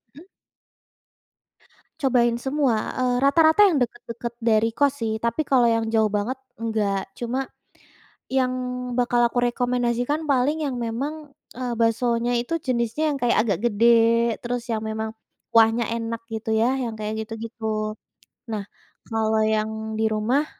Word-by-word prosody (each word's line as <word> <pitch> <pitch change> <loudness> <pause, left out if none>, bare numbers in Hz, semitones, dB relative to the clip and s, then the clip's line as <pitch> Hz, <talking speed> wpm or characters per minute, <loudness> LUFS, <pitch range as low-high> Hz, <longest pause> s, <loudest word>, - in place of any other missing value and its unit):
mmm. 320 +6 -14 1.7
Cobain 240 -3 +3
semua, 265 -5 0
eee, 250 -1 +1
rata-rata 315 +6 +4
yang 345 - +1
deket-deket 235 -2 -3
dari 225 0 +2
kos 280 -1 +1
sih 220 0 -2
tapi 235 +7 0
kalau 255 -4 +4
yang 230 -1 +2
jauh 220 -1 +3
banget 210 +6 -2 0.2
enggak. 210 -4 -2
Cuma 250 +3 -3 0.8
yang 260 -1 +1 0.5
bakal 245 -1 +2
aku 245 - -2
rekomendasikan 245 +4 0
paling 280 +2 +2
yang 270 - -2
memang, 275 +6 -4 0.2
eee, 250 0 -3
baksonya 235 +1 +1
itu 245 +8 -1
jenisnya 255 +3 -1
yang - - -4
kayak 240 -1 +3
agak 200 -6 0
gede 215 +2 +2 0.6
terus 240 0 -3
yang 225 -3 -2
memang 220 0 -4 0.4
kuahnya 225 +1 +5
enak 230 0 -3 0.2
gitu 220 0 -4
ya 220 +1 +3 0.2
yang 230 -3 -4
kayak 215 0 -3
gitu-gitu. 220 -1 -4 0.6
Nah, 215 -2 -2 0.5
kalau 220 -1 +1
yang 215 0 0 0.3
di 220 - +2
rumah 245 +8 +1
235 Hz, 135 wpm, -24 LUFS, 220-255 Hz, 1.7 s, kuahnya